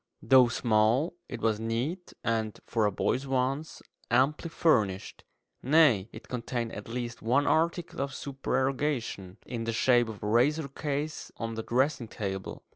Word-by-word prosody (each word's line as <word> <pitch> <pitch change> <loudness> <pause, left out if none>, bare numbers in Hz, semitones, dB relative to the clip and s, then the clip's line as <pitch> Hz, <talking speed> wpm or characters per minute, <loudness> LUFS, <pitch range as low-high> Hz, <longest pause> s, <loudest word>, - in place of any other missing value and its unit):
Though 130 -2 +7
small, 115 +6 +2 0.2
it 120 - -6
was 110 -2 +1
neat, 125 +11 -3
and, 110 -2 -1
for 110 -3 +1
a - - 0
boy's 130 +7 -1
wants, 135 +4 -1 0.3
amply 135 +7 +2
furnished; 105 - +1 0.4
nay, 130 -8 +4
it - - -11
contained 120 -1 -3
at 105 - -7
least 120 0 -5
one 130 +6 +2
article 170 +2 0
of 140 - -2
supererogation, 135 -7 -2
in 115 -3 -4
the 115 - -1
shape 120 0 +3
of 105 -2 -8
a - - -1
razor 140 +7 +2
case 145 +2 -4
on 115 -1 -4
the 110 - -3
dressing 125 +1 0
table. 95 -3 -5
125 Hz, 150 wpm, -29 LUFS, 115-140 Hz, 0.4 s, Though